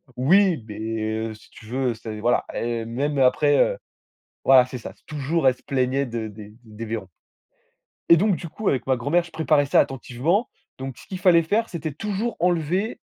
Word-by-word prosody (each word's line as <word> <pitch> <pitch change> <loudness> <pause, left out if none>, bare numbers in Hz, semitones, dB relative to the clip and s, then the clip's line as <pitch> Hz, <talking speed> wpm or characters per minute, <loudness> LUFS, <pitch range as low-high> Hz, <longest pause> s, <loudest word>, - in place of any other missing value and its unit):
Oui 170 - +3
mais 110 +1 -4 0.3
heu, - - -6
si 110 - -17
tu 110 - -15
veux, 125 +1 -1
c'est 110 -1 -7
voilà, 120 +3 +1
eh 115 -1 -2
même 140 +5 -2
après, 145 +2 +4
heu - - +3 0.7
voilà 130 -2 +7
c'est 130 0 -7
ça. 115 - -9
Toujours 150 0 0
elle 130 - +4
se - - -26
plaignait 135 0 0
de 115 -2 -4
des 105 0 -12
des 110 0 -8
vairons 110 -4 -4 1.0
et 170 - +8
donc 200 +1 +2
du 170 - -7
coup 215 +5 -5
avec 130 - -1
ma 130 - +3
grand-mère, 155 +8 +1
je 170 - -14
préparais 155 -2 +2
ça 140 - +3
attentivement, 135 - 0 0.3
donc 130 -1 -6
ce - - -15
qu'il 185 -2 -6
fallait 175 -3 +5
faire 220 +7 0
c'était 160 -3 -4
toujours 210 - -3
enlever, 175 +4 0
135 Hz, 190 wpm, -23 LUFS, 120-170 Hz, 1.0 s, et